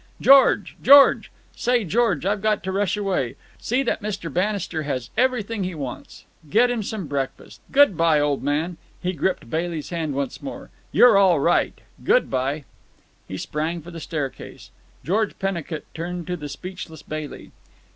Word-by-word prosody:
George! 270 -6 +5
George! 280 +2 +7 0.3
Say, 245 -2 +1
George, 195 -4 +1
I've 200 +1 0
got 215 -1 +1
to 190 - -3
rush 200 +1 0
away. 190 - -1 0.2
See 255 +4 0
that - - -1
Mr. 200 -7 -4
Bannister 185 -3 -1
has 130 -5 -4
everything 230 -5 0
he 180 -1 -4
wants. 135 -5 -8 0.2
Get 240 +7 +4
him 240 -2 -1
some 210 -2 -4
breakfast. 140 -2 -5
Good 280 -8 +5
bye, 165 -2 +3
old 145 -1 0
man." 155 +5 -1 0.2
He 180 +1 -2
gripped 180 -1 -2
Bailey's 165 +3 -3
hand 160 -5 -2
once 140 -2 -3
more. 275 - -8 0.2
"You're 230 -5 +6
all 185 -5 +4
right. 170 +5 +1 0.2
Good - - +3
bye!" 135 +4 -1 0.6
He 95 - -6
sprang 155 - -3
for 175 - -10
the 165 - -8
staircase. 150 -4 -6 0.3
George 205 +5 0
Pennicut 170 -5 -3
turned 175 +1 -5
to 180 - -3
the 150 -4 -7
speechless 160 0 -8
Bailey. 155 -1 -7
175 Hz, 160 wpm, -23 LUFS, 150-210 Hz, 0.6 s, George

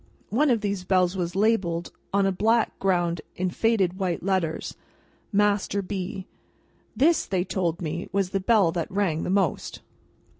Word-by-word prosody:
One 285 +7 +3
of 235 -4 +2
these 200 -3 -2
bells 185 0 +2
was 175 -1 -3
labelled, 190 -5 +1 0.2
on 200 0 +2
a 195 - +2
black 220 +4 +1
ground 175 -3 +1
in 185 0 -1
faded 195 -4 +1
white 180 -4 -1
letters, 185 -4 -1 0.6
MASTER 205 -1 +1
B. 190 0 -5 0.7
This, 310 +8 +3
they 185 -2 0
told 180 -2 -2
me, 165 +2 -4
was 195 -2 0
the 195 - 0
bell 195 -3 +3
that 170 -1 -3
rang 185 -5 0
the - - -3
most. 195 +1 0
190 Hz, 155 wpm, -25 LUFS, 175-205 Hz, 0.7 s, One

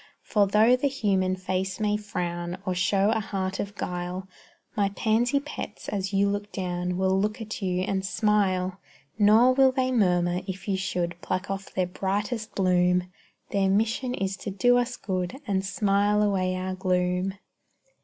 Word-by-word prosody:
For 205 -2 +2
though 220 +5 +5
the 260 +3 0
human 195 -8 +1
face 185 +1 -3
may 210 -1 +1
frown, 175 -4 -3
Or 185 - 0
show 195 +3 +2
a 220 - +1
heart 195 -2 -3
of 200 0 -4
guile, 180 0 -4 0.5
My 200 -1 +2
pansy 235 +6 +1
pets 295 +2 -7
as 195 -1 -2
you 200 0 +3
look 205 +1 -3
down 180 -1 -2
Will 190 0 +2
look 210 +3 -1
at 215 -1 -6
you 180 -1 0
and 190 0 -1
smile; 195 -3 +1 0.4
Nor 220 +5 +6
will 265 0 +5
they 260 0 0
murmur 180 -6 +2
if 190 +1 -6
you 195 - +1
should 175 -2 -2
Pluck 185 +2 -2
off 195 0 -5
their 185 - 0
brightest 205 +5 -3
bloom; 180 -1 +2 0.4
Their 195 -1 +2
mission 225 +5 +1
is 195 0 -2
to 200 - -5
do 245 +6 +3
us 245 0 -2
good, 185 +3 -3
And 195 -2 0
smile 205 +1 +2
away 185 -3 +1
our 185 0 -3
gloom. 185 0 0
195 Hz, 165 wpm, -26 LUFS, 185-210 Hz, 0.5 s, Nor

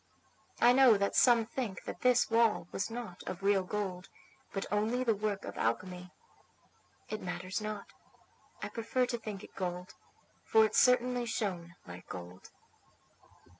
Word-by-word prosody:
I 240 +1 +6
know 255 -4 +7
that 200 0 0
some 235 -3 +5
think 220 -5 -4
that - - -7
this 250 -2 +3
wall 225 -6 +3
was 195 - -2
not 225 -6 -7
of 185 +1 -5
real 200 -1 +4
gold, 185 -1 -4 0.4
but 195 - -3
only 220 +5 +1
the 230 -3 +3
work 205 -1 -2
of - - -7
alchemy; 180 +10 -2 1.0
it 215 - -4
matters 185 +2 -4
not; 210 -1 -4 0.8
I - - -3
prefer 230 +2 0
to 245 -1 -2
think 210 -3 -7
it - - -13
gold, 180 -1 -4 0.5
for 220 0 +5
it 215 - -3
certainly 250 -1 +3
shone 180 -7 -3
like 90 0 -11
gold. 90 +1 -9
210 Hz, 150 wpm, -32 LUFS, 185-235 Hz, 1.0 s, know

